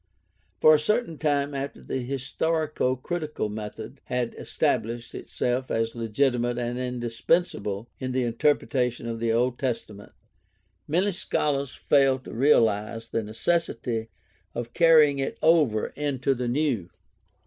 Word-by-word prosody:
For 155 - +7
a 155 - +5
certain 210 -1 0
time 145 -2 +1
after 140 0 -4
the 130 - -4
historico 140 +1 -1
critical 155 -7 -3
method 110 +4 -7
had 125 -2 -1
estab - - 0
lished 115 +1 -7
itself 125 +1 -2
as 115 0 0
legitimate 120 +1 0
and 120 0 -2
indispensable 120 - -1
in 130 -1 -3
the 130 0 0
interpre 120 +5 +1
tation 125 -3 -1
of 115 -1 -4
the 115 0 +1
Old 120 +2 +1
Testament 115 -5 -4 0.7
many 185 +7 +2
scholars 140 -6 -1
failed 135 -2 +3
to - - -8
realize 115 -3 +2
the 115 - -1
necessity 115 -1 -1 0.5
of 120 0 -5
carrying 155 -4 +5
it 135 - -2
over 150 -10 +3
into 140 -2 -1
the 125 -1 -3
New. 120 - 0
125 Hz, 135 wpm, -26 LUFS, 115-145 Hz, 0.7 s, For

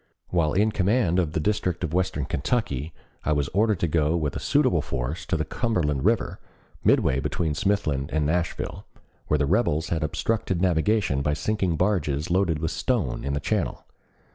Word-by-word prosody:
While 80 -4 +1
in 105 +3 +3
command 95 -2 +2
of 80 -4 0
the - - 0
district 95 -1 -1
of 80 -2 -2
western 90 -6 0
Kentucky 75 - -1 0.3
I 75 - +1
was 70 -1 0
ordered 105 -1 +2
to 85 - +2
go 80 +1 +2
with 75 -4 -2
a - - -2
suitable - - +2
force 65 +6 -4
to - - +1
the 80 - -1
Cumberland 75 - -1
River, - - +1 0.4
midway 65 - +3
between 75 +2 -1
Smithland 75 -6 0
and 75 -1 +1
Nashville, 85 +2 -2 0.4
where 75 - +2
the 75 - +1
rebels 80 -2 +1
had 85 -1 -1
obstructed 95 +4 -1
navigation 90 -3 +2
by 75 +1 +1
sinking 90 +2 0
barges 85 -5 0
loaded 90 -3 +2
with 80 +2 -2
stone 105 - -1
in 70 - -2
the 70 - 0
channel. - - -2
80 Hz, 175 wpm, -25 LUFS, 75-95 Hz, 0.4 s, in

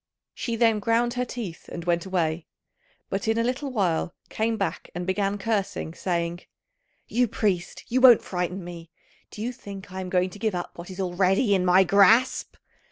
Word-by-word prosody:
She 235 - -3
then 225 -2 +3
ground 230 +3 +1
her 250 0 -1
teeth 215 -9 -7
and 170 -1 -7
went 175 +1 0
away; 170 -3 -1 0.6
but 195 +2 -2
in 220 +1 +2
a 230 - +2
little 255 +4 -2
while 180 -6 0
came 225 +1 -1
back, 195 - -3
and 175 0 -3
began 195 +2 0
cursing, 200 -6 -2
saying, 170 -1 -2 0.7
"You 245 +1 +1
priest, 195 -5 -1
you 255 +2 +1
won't 250 -3 +8
frighten 180 +1 -3
me. 170 -1 -9 0.4
Do 215 - -7
you 245 - -1
think 200 -6 -10
I 190 0 -5
am 185 - -5
going 185 0 +1
to 205 - -11
give 215 -2 0
up 175 - -5
what 175 +2 -9
is 185 0 -9
already 190 +4 +2
in 190 -2 +2
my 185 +1 +6
grasp?" 205 +7 +4
195 Hz, 185 wpm, -25 LUFS, 180-225 Hz, 0.7 s, won't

